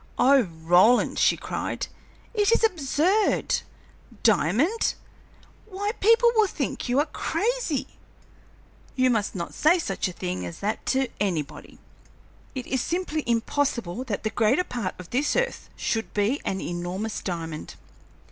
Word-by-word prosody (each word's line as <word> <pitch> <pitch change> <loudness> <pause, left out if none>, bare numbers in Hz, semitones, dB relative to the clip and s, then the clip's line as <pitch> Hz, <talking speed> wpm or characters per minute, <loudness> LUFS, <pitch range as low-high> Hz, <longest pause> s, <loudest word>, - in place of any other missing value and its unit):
"Oh, 275 +1 +6
Roland," 175 +5 +3
she - - +4
cried, - - -3 0.5
"it 415 -1 +2
is 460 - +3
absurd! 360 +2 +2 0.6
Diamond! 230 - +2 0.7
Why, 405 0 -2
people 460 +3 +5
will 435 -2 +5
think 275 -7 -3
you 245 - +2
are 290 - +4
crazy. 455 - -1 1.1
You 255 -1 +3
must 210 -4 0
not 170 -2 -4
say 315 +4 +4
such 330 - -2
a - - -4
thing 90 - -4
as 85 -1 -6
that 210 +2 -2
to 265 0 +2
anybody. 175 -8 -3 0.8
It 255 -2 -4
is 260 -2 -1
simply 330 -1 -2
impossible 235 -3 0
that 220 -5 -3
the 220 - -1
greater 230 +9 +2
part 235 - -4
of 180 -2 -11
this 275 +4 +1
earth - - -1
should 225 -1 -2
be 210 +8 +1
an 190 - -2
enormous 180 +5 -4
diamond." 165 -4 -5
250 Hz, 140 wpm, -25 LUFS, -, 1.1 s, Oh